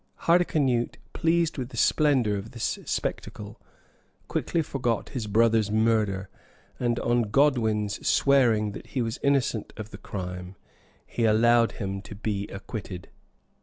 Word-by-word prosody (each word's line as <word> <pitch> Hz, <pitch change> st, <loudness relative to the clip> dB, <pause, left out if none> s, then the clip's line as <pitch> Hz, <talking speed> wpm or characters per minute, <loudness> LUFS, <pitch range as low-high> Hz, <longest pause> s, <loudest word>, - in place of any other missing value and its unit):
Hardicanute, 150 Hz, -8 st, +2 dB, 0.2 s
pleased 165 Hz, -2 st, +1 dB
with 125 Hz, -1 st, -4 dB
the 120 Hz, -, -10 dB
splendor 130 Hz, -5 st, +3 dB
of 100 Hz, +3 st, -6 dB
this 115 Hz, -2 st, -2 dB
spectacle, -, -, -4 dB, 0.7 s
quickly 165 Hz, -, -1 dB
forgot 120 Hz, -6 st, -2 dB
his 120 Hz, -6 st, -4 dB
brother's 110 Hz, 0 st, +3 dB
murder; 110 Hz, -3 st, +1 dB, 0.5 s
and 120 Hz, -1 st, 0 dB
on 120 Hz, 0 st, +2 dB
Godwin's 110 Hz, -6 st, +1 dB
swearing 120 Hz, -7 st, +3 dB
that -, -, -9 dB
he 130 Hz, -, -1 dB
was 115 Hz, 0 st, -4 dB
innocent 140 Hz, -5 st, 0 dB
of 110 Hz, -1 st, -7 dB
the -, -, -9 dB
crime, 90 Hz, -1 st, -6 dB, 0.5 s
he 115 Hz, -, -1 dB
allowed 115 Hz, +2 st, +4 dB
him 95 Hz, -1 st, -4 dB
to 105 Hz, +1 st, -10 dB
be 100 Hz, -1 st, -3 dB
acquitted. 95 Hz, -2 st, -7 dB
115 Hz, 130 wpm, -26 LUFS, 105-130 Hz, 0.7 s, allowed